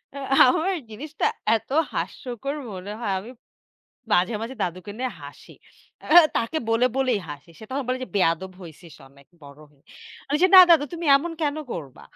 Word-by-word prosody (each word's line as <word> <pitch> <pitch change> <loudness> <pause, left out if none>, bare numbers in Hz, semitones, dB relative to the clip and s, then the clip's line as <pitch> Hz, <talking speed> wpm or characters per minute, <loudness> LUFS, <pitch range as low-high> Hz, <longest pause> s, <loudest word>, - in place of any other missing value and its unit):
আ - - -7 0.3
আমার 320 +9 0 0.2
জিনিসটা 290 +8 -5 0.3
এত - - -19 0.2
হাস্যকর 265 +2 -5 0.2
মনে 190 +2 -8
হয় 210 -5 -2
আমি 220 +6 -11 0.8
মাঝে, 185 +6 +2
মাঝে, 235 +4 -6
দাদুকে 185 +3 -5
নিয়ে 255 0 -2
হাসি। - - -13 0.5
আ - - -11 0.3
তাকে 230 +8 -2
বলে, 230 +2 +3
বলেই 255 -5 +1
হাসি। 145 +3 -10
সে - - -11
তখন 270 +1 -3
বলে 255 0 -1
যে, - - -17
"বেয়াদব 185 0 0
হইছিস 165 -1 -13
অনেক 140 0 -22 0.2
বড় 140 +1 -14
হয়ে।" 145 -2 -30 0.5
আমি 290 - +1
যে, - - +7
"না - - +13
দাদু 320 -4 +6
তুমি 335 -1 -5
এমন 330 +5 -3
কেনো 300 0 -1
করবা?" 140 -7 -8
225 Hz, 175 wpm, -23 LUFS, 175-275 Hz, 0.8 s, না